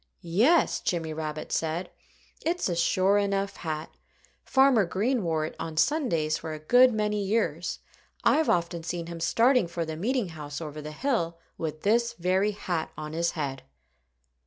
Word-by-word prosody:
"Yes!" 225 - +3
Jimmy 165 -3 -2
Rabbit 155 -1 -5
said. 165 +3 -1 0.5
"It's 345 +2 0
a 175 - -1
sure 185 +4 +3
enough 200 0 -1
hat. 155 -2 -4 0.5
Farmer 265 -5 +4
Green 215 +7 0
wore 160 -2 0
it - - -7
on 160 -1 -5
Sundays 165 - +1
for 160 - -5
a - - -5
good 245 +11 +6
many 210 -2 0
years. 215 +4 -1 0.5
I've 315 0 +3
often 170 -1 +1
seen 170 +1 -4
him 170 0 -7
starting 230 +5 +3
for 170 0 -3
the 160 0 -5
meeting 225 +4 -1
house 150 -3 -7
over 155 -2 -6
the 150 +1 -7
hill 170 - -1 0.2
with 155 -1 -5
this 235 +3 +2
very 190 +1 +1
hat 175 -5 -3
on 155 0 -6
his 170 +1 0
head." 140 -5 -3
175 Hz, 160 wpm, -27 LUFS, 160-215 Hz, 0.5 s, good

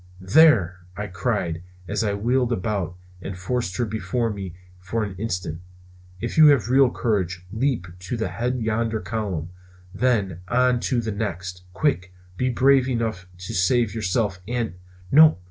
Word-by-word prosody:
"There!" 95 - +5 0.2
I 105 - -3
cried 95 -4 -2 0.3
as 105 +4 -1
I 100 -2 0
wheeled 125 +4 +1
about 100 -4 -2 0.3
and 95 0 -6
forced 95 0 -2
her 120 - +1
before 115 +2 -1
me 95 -4 -6 0.2
for 95 +5 -2
an 100 -2 -4
instant, 90 -6 -3 0.6
"if 120 +8 -2
you 155 - +10
have 135 -5 +4
real 135 -1 +6
courage 95 -7 -1
leap 115 -2 0
to 95 +6 -4
the 110 - -1
head 125 +2 -1
of 125 - -4
yonder 110 0 0
column, 100 -8 -3 0.4
then 100 -9 +1
on 125 +2 +3
to 125 -3 +1
the 110 -1 -3
next! 95 -3 -4
Quick! 95 -6 0 0.2
be 125 +6 0
brave 130 +1 +4
enough 110 -6 -2
to 95 +5 -7
save 110 +3 +2
yourself 105 -2 -1
and 120 -3 -2 0.2
" 90 0 -22
"No! 155 -3 +7
110 Hz, 165 wpm, -24 LUFS, 95-120 Hz, 0.6 s, you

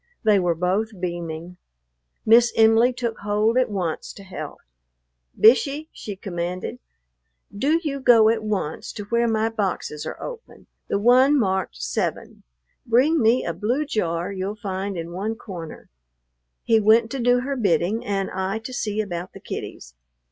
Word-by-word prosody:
They 210 -3 +4
were 175 -2 +1
both 190 +5 -1
beaming. 175 -1 -5 0.7
Miss 235 +2 +6
Em'ly 225 +2 +5
took 240 -2 -4
hold 210 +3 +1
at 255 -1 +2
once 180 -6 -3
to 200 - -12
help. 190 -1 -7 0.8
"Bishey," 280 +7 +4
she 205 - -7
commanded, 180 -1 -5 0.8
"do 295 +10 +2
you 280 -3 -2
go 235 -4 +6
at 225 0 +2
once 200 -8 -3
to 205 - -6
where 235 +3 +1
my 220 -1 +1
boxes 195 -8 -3
are - - -6
open, 485 -2 -9 0.2
the - - 0
one 255 +7 +5
marked 190 - -1
7; - - -3 0.4
bring 265 +7 +3
me 230 +3 +3
a 170 - -2
blue 240 - -1
jar 175 - -2
you'll 195 +2 -4
find 195 -2 -4
in 165 0 -5
one 205 +5 -3
corner." 180 -8 -9 0.8
He 225 -1 +4
went 220 +2 +4
to 275 - -3
do 245 +1 +3
her 275 +2 -3
bidding, 200 - +1
and 195 -1 -2
I 190 +2 -2
to 225 +3 -8
see 215 -3 -1
about 175 -3 -5
the - - -11
kiddies. - - -7
215 Hz, 155 wpm, -23 LUFS, 185-235 Hz, 0.8 s, Miss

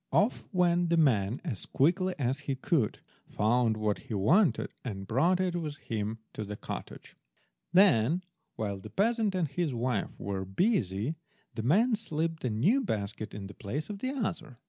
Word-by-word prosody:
Off 215 +4 +2
went 175 -2 +3
the 170 - +3
man 115 -8 +3
as 110 - -4
quickly 180 +6 +2
as 135 0 0
he 135 - +1
could, 130 -3 0 0.3
found 115 +1 +2
what 105 -1 0
he 110 - -6
wanted, 165 - +3
and 95 -6 -5
brought 165 - +2
it 185 -2 0
with 155 -4 -3
him 110 -4 -3 0.2
to 110 - -4
the 105 0 -5
cottage. - - -8 0.6
Then 175 - +5 0.3
while 100 -3 -3
the - - -10
peasant 220 -1 +1
and 175 -4 +1
his 145 -1 -2
wife 120 -3 0
were 100 -1 -3
busy, 110 - 0 0.4
the 115 - -3
men 205 - +3
slipped 165 -6 -1
the 125 - -1
new 165 - +3
basket 105 - -3
in 100 -1 -6
the 100 - -9
place 140 - -4
of 200 - -6
the 255 - -2
other. 170 - -3
140 Hz, 170 wpm, -30 LUFS, 110-180 Hz, 0.6 s, Then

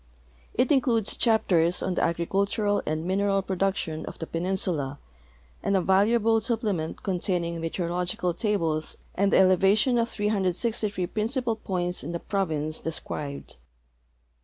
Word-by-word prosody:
It 250 +2 +2
in 275 -3 +5
cludes 230 -5 +2
chaptei*s 180 -7 +2
on 185 - -1
the - - -1
agricultural 200 +5 0
and 155 +1 -2
mineral 195 +1 +1
production 190 -4 -1
of - - -7
the 165 - -5
penin 180 +4 -2
sula, 145 -7 -1 0.6
and 200 - +1
a - - +2
valuable 225 +4 +3
siqiplement 215 -8 -2
containing 175 -3 -1
meteorological 175 +1 -1
tables 165 -6 0 0.2
and 200 +1 +1
the - - +5
elevation 195 +6 +4
of 230 0 0
363 205 -1 -1
principal 230 +5 -1
points 180 -4 -3
in 165 +4 -5
the 170 - -2
province 155 -7 -2
described. 145 - -5
190 Hz, 135 wpm, -26 LUFS, 170-210 Hz, 0.6 s, in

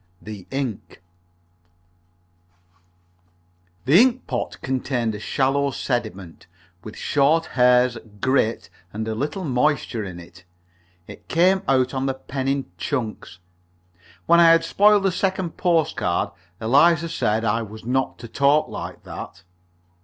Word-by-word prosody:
THE 105 -4 -10
INK 135 -6 -5 2.9
The 155 - +6
ink 255 0 +2
pot - - -4
contained 125 -3 -1
a 105 - -6
shallow 135 +5 0
sediment, 110 -10 -4 0.4
with 110 - -10
short 150 +3 +2
hairs, 125 -1 +3 0.2
grit, 130 -1 0 0.2
and 110 +1 -5
a 110 - -2
little 145 - -3
moisture 130 -4 0
in 90 -3 -7
it. 85 +1 -15 0.6
It - - -13
came 185 +3 +3
out 130 -1 +2
on 135 0 -1
the 135 - -1
pen 130 0 -5
in 135 0 0
chunks. 115 -9 -4 0.9
When 170 - +5
I 170 -1 +7
had 165 0 +5
spoiled 205 +3 +4
the 195 - +2
second 185 -2 -2
postcard, 165 - 0 0.3
Eliza 150 +8 +4
said 115 -8 -1
I 115 +1 +1
was 110 0 -9
not 130 +2 -1
to - - -7
talk 140 +5 +2
like - - -7
that. 85 - -9
130 Hz, 130 wpm, -22 LUFS, 110-160 Hz, 2.9 s, I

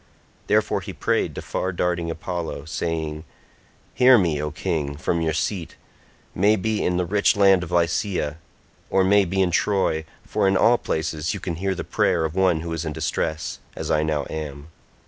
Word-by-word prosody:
Therefore - - +2
he - - -7
prayed - - 0
to - - -6
far 95 - -2
darting 85 -1 -1
Apollo 80 -3 -4
saying, 80 -1 -3 0.7
"Hear 130 0 +7
me 85 -7 +1
O 75 - -2
king 75 -3 -3
from 85 +2 -1
your 80 -1 +1
seat, 90 0 -2 0.6
may 105 +4 +4
be 110 +1 -1
in 90 0 +1
the 90 - +1
rich 100 +3 +2
land 95 -2 +5
of 90 - -6
Lycia, 85 -2 0 0.5
or 95 - +3
may 100 +1 +4
be 95 +2 +1
in 90 - 0
Troy, 90 -4 +1 0.2
for - - +1
in 95 0 +3
all 120 +4 +4
places 80 +3 -2
you - - -5
can 85 -4 -4
hear 95 +1 -1
the - - -4
prayer 85 -2 +1
of 80 - -3
one 90 -3 +2
who 85 0 -4
is 80 0 -3
in 80 -2 -3
distress, 80 0 -2 0.2
as - - -4
I 75 - +3
now 75 -3 -1
am. 75 -1 -6
85 Hz, 185 wpm, -23 LUFS, 80-95 Hz, 0.7 s, Hear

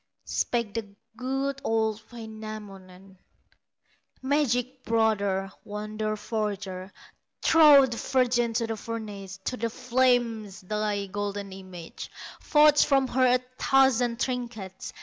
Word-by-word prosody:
Spake 235 -4 -1
the 205 -3 -5 0.2
good, 270 +2 -2
old 220 -1 0
Wainamoinen: 205 -5 -10 1.0
"Magic 260 -2 0
brother, 205 -4 +1
wonder 215 +1 -3
forger, 200 -3 -4 0.5
Throw 300 -4 +8
the 240 -3 -5
virgin 245 -3 +1
to 230 +1 0
the 225 -1 -4
furnace, 205 -4 -6
To 250 - -2
the 230 0 -1
flames, 240 -4 +1
thy 210 +1 -2
golden 200 0 -4
image, 185 -3 -9 0.3
Forge 300 -1 +5
from 270 -2 +2
her 255 -1 +4
a 250 - 0 0.2
thousand 250 -3 +3
trinkets. 235 -8 -4
225 Hz, 110 wpm, -27 LUFS, 205-250 Hz, 1.0 s, Throw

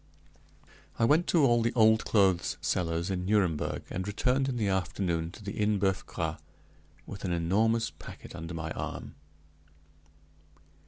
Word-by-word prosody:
I 115 - +3
went 155 +8 +3
to 160 -5 +4
all 120 -2 +4
the 115 +2 0
old 110 -1 +5
clothes 95 -5 +2
sellers 85 0 -1
in 90 -1 -2
Nuremberg, 95 -6 0
and 95 +2 -3
returned 130 +6 +1
in 125 - -2
the 105 -3 0
afternoon 90 -3 -1
to 105 - -12
the 100 - -4
Inn 105 0 +1
Boeuf 95 -1 0
Gras, - - -3 0.7
with 100 - -9
an 90 - -1
enormous 110 +7 +1
packet - - -11
under 80 +1 -6
my 80 -1 -4
arm. - - -5
100 Hz, 150 wpm, -29 LUFS, 90-115 Hz, 0.7 s, old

